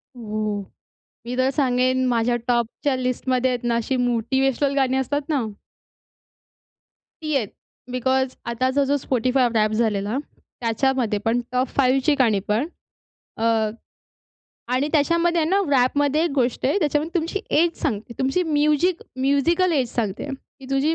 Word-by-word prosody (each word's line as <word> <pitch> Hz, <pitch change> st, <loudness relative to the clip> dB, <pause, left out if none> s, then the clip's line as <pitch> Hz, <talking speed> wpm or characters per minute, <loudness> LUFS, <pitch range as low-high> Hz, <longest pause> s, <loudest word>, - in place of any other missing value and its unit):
हो. 215 Hz, -3 st, -3 dB, 0.6 s
मी 245 Hz, +1 st, -4 dB
तर 260 Hz, +1 st, +3 dB
सांगेन 255 Hz, -2 st, +2 dB
माझ्या 240 Hz, 0 st, +1 dB
टॉपच्या 240 Hz, +3 st, 0 dB
लिस्टमध्ये 255 Hz, 0 st, 0 dB
आहेत 245 Hz, -1 st, -3 dB
ना 235 Hz, -, +1 dB
अशी 235 Hz, +3 st, -1 dB
मोटिवेशनल 265 Hz, +4 st, +1 dB
गाणी 265 Hz, -1 st, +2 dB
असतात 285 Hz, +3 st, 0 dB
ना. 280 Hz, -6 st, +1 dB, 1.8 s
ती 305 Hz, -2 st, -1 dB
आहेत. 225 Hz, -7 st, +1 dB, 0.4 s
बिकॉज 260 Hz, +1 st, 0 dB
आताचा 255 Hz, +4 st, +1 dB
जो 285 Hz, +1 st, +1 dB
Spotify 255 Hz, 0 st, +2 dB
रॅप 215 Hz, 0 st, +3 dB
झालेला 215 Hz, 0 st, 0 dB, 0.4 s
त्याच्यामध्ये, 230 Hz, -2 st, 0 dB
पण 230 Hz, +2 st, +2 dB
टॉप 255 Hz, +1 st, +1 dB
5 270 Hz, 0 st, +3 dB
ची 300 Hz, -, +4 dB
गाणी 220 Hz, -5 st, +3 dB
पण 220 Hz, +8 st, +1 dB, 0.7 s
अ, 225 Hz, -, -2 dB, 1.3 s
आणि 270 Hz, +4 st, +1 dB
त्याच्यामध्ये 335 Hz, +3 st, +2 dB
आहे 315 Hz, -, +1 dB
ना 395 Hz, +1 st, +3 dB
रॅपमध्ये 285 Hz, +3 st, +2 dB
एक 340 Hz, -, 0 dB
गोष्ट 250 Hz, -2 st, 0 dB
आहे. 285 Hz, +9 st, +2 dB
त्याच्यामध्ये 305 Hz, 0 st, 0 dB
तुमची 330 Hz, +5 st, -3 dB, 0.2 s
एज 340 Hz, -1 st, 0 dB
सांगते. 235 Hz, -5 st, -2 dB
तुमची 270 Hz, +7 st, +1 dB
म्युझिक 305 Hz, +2 st, +1 dB, 0.2 s
म्यूजिकल 330 Hz, +7 st, +2 dB
एज 260 Hz, -6 st, +1 dB
सांगते, 220 Hz, +2 st, -2 dB, 0.3 s
की 265 Hz, -, -11 dB
तुझी 285 Hz, +4 st, +2 dB
260 Hz, 140 wpm, -23 LUFS, 240-290 Hz, 1.8 s, ची